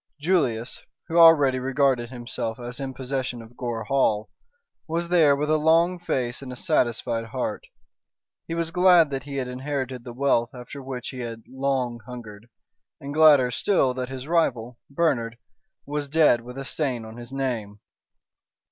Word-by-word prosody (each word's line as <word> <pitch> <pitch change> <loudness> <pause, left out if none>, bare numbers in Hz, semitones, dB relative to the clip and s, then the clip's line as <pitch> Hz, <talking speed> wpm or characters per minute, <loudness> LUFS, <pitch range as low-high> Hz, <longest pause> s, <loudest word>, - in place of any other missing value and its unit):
Julius, 140 -9 0 0.3
who 165 +1 +2
already 145 -6 +7
regarded 130 -2 +1
himself 120 -2 -5
as 125 +2 -7
in 135 -1 -5
possession 130 -2 -3
of 115 +1 -13
Gore 120 -3 -4
Hall, 110 -6 +1 0.6
was 170 +1 -2
there 160 -5 +5
with 150 +2 -1
a 155 - +3
long 165 +3 +3
face 125 -8 -2
and 130 -2 -8
a - - -6
satisfied 120 -4 0
heart. 110 - -4 0.8
He 165 - -3
was 165 -1 -2
glad 180 -4 +5
that 135 0 -4
he 140 -1 -7
had 130 -2 -2
inherited 130 -1 -4
the 120 - -8
wealth 130 -1 +1
after 125 +3 -9
which 130 -2 -6
he 130 - -8
had 115 -2 -6
long 130 -3 -2
hungered, 115 -3 -10 0.5
and 140 +1 -7
gladder 145 -5 +6
still 135 -2 +2
that 125 0 -4
his 130 -1 -6
rival, 125 -8 0
Bernard, 130 -7 0 0.5
was 145 0 -3
dead 150 -6 +4
with 125 +2 -10
a 135 - -5
stain 130 -6 -2
on 110 +1 -10
his 120 +1 -10
name. 120 -7 -3
130 Hz, 165 wpm, -25 LUFS, 120-145 Hz, 0.8 s, already